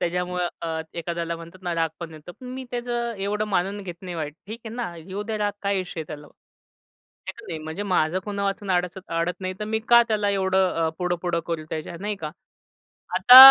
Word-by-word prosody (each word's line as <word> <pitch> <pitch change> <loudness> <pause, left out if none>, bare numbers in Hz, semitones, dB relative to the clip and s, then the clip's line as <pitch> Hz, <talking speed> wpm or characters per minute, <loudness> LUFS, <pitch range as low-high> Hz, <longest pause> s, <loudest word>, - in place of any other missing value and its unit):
त्याच्यामुळे 180 +1 0 0.2
अ, 160 -1 -1
एखाद्याला 170 0 -2
म्हणतात 170 +3 -11
ना 175 -1 -1
राग 165 -1 +2
पण 165 -1 -5
येतो. 155 +3 -10
पण 250 +6 -12
मी 260 0 -5
त्याचं 240 -1 -1
एवढं 210 +2 0
मानून 195 +1 +1
घेत 175 -3 -5
नाही 180 -2 -5
वाईट. 150 -2 -3
ठीक 225 +3 -6
आहे 225 - -6
ना 235 -8 -3
येऊ 190 +5 -5
द्या 220 0 -2
राग 205 -1 +1
काय 200 -1 +2
इश्यू 180 -2 -5
आहे 155 - -5
त्याला. 150 -1 -7
आहे - - -15
की - - -10
नाही? 160 - -3
म्हणजे 160 +6 -3
माझं 180 -3 +2
कुणावाचून 200 -1 -1
अडच 180 0 +1
अडत 170 +3 0
नाही, 185 0 -2
तर - - 0
मी 220 +1 +1
का 235 0 +9
त्याला 210 -2 +2
एवढं 190 -1 +3 0.2
अ, - - +2
पुढं-पुढं 175 -1 0
करू 165 -2 -2
त्याच्या, 160 +2 -4
नाही 210 0 -1
का? 155 -5 -4 0.8
आता 250 +1 +9
185 Hz, 210 wpm, -25 LUFS, 170-205 Hz, 0.8 s, का